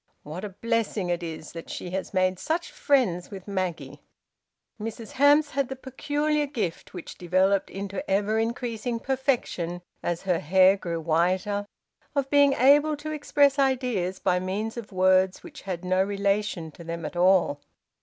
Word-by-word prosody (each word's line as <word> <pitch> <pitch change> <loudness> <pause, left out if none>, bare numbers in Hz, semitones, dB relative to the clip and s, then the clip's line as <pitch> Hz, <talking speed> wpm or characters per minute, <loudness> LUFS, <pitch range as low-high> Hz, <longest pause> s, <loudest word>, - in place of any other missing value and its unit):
What 160 +6 -7
a 210 - -4
blessing 215 -2 -1
it 175 0 -1
is 160 -1 -7
she 175 - -6
has 190 0 -3
made 185 -1 +1
such 325 +3 -2
friends 215 -12 +1
with 195 -2 -9
Maggie!" 185 -4 -3 0.8
Mrs 225 0 -6
Hamps 290 +2 +4
had 275 -2 -1
the 265 - -4
peculiar 290 +3 -1
gift, 210 - -4
which 175 - -8
developed 185 +2 +2
into 195 0 -5
ever 205 +3 +1
increasing 230 0 -2
perfection 245 -10 -1 0.2
as 175 0 -2
her 180 -3 +1
hair 185 +4 +5
grew 170 -4 -4
whiter, 185 +6 0 0.5
of 275 -1 0
being 285 -1 +5
able 290 +4 +4
to 310 +2 -6
express 285 -2 +2
ideas 250 -9 +1
by 180 - +1
means 200 +5 -3
of 230 -3 -7
words 185 0 +3
which - - -11
had 185 -2 -5
no 185 +1 +2
relation 200 -4 -1
to 170 - -12
them 165 0 -5
at 150 - -6
all. 180 -5 +3
200 Hz, 155 wpm, -26 LUFS, 180-260 Hz, 0.8 s, hair